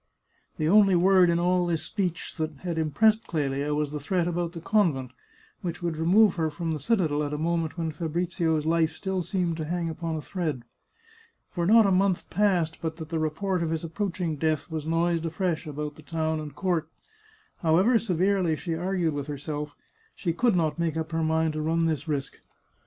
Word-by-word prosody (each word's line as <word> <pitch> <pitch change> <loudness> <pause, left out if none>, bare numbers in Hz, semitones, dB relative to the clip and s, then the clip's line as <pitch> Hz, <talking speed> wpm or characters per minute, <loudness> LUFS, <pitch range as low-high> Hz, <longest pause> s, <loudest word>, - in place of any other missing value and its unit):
The 155 - 0
only 195 +1 +6
word 185 0 +5
in 170 - +2
all 180 +1 +2
this 165 -2 -1
speech 180 -1 -3
that 155 -2 -3
had 170 -3 -2
impressed 215 +9 +2
Clelia 145 -2 -1
was 150 -1 -1
the 150 - -4
threat 175 +4 0
about 175 -1 -2
the 170 - -6
convent, 160 - +1 0.5
which 175 0 -5
would 170 -2 -1
re 160 +1 -2
move 205 0 +5
her 160 -1 +1
from 165 +2 -4
the 155 - -2
citadel 155 - +1
at 145 0 -2
a - - -3
moment 165 +1 -1
when 165 -2 -2
Fabrizio's 165 -1 -1
life 160 0 +2
still 190 +1 -2
seemed 175 -2 -1
to 155 - -3
hang 170 +1 -2
upon 165 0 -4
a 155 - -3
thread. 155 -10 -3 0.9
For 170 -1 -1
not 225 +1 +7
a 195 - +3
month 190 -1 +1
passed 180 -6 +1
but 160 -1 -3
that 160 -2 -7
the 165 -1 -1
report 170 +4 -1
of 165 - -1
his 160 0 -2
approaching 170 -2 -2
death 155 +1 -1
was 160 -1 -4
noised 165 0 +1
afresh 165 0 -2
about 150 0 -4
the 155 - -14
town 160 0 -2
and 150 -2 -7
court. 170 -4 -1 0.7
However 185 +9 +4
severely 185 -4 +1
she 165 +2 -4
argued 175 -1 0
with 145 0 -4
herself, 150 0 -5 0.4
she 170 -3 -2
could 235 +3 +2
not 165 -1 0
make 165 -2 0
up 160 0 -3
her 165 0 0
mind 160 0 +1
to 155 - -3
run 165 +2 +1
this 155 -1 -1
risk. 140 -3 -3
165 Hz, 200 wpm, -27 LUFS, 155-180 Hz, 0.9 s, not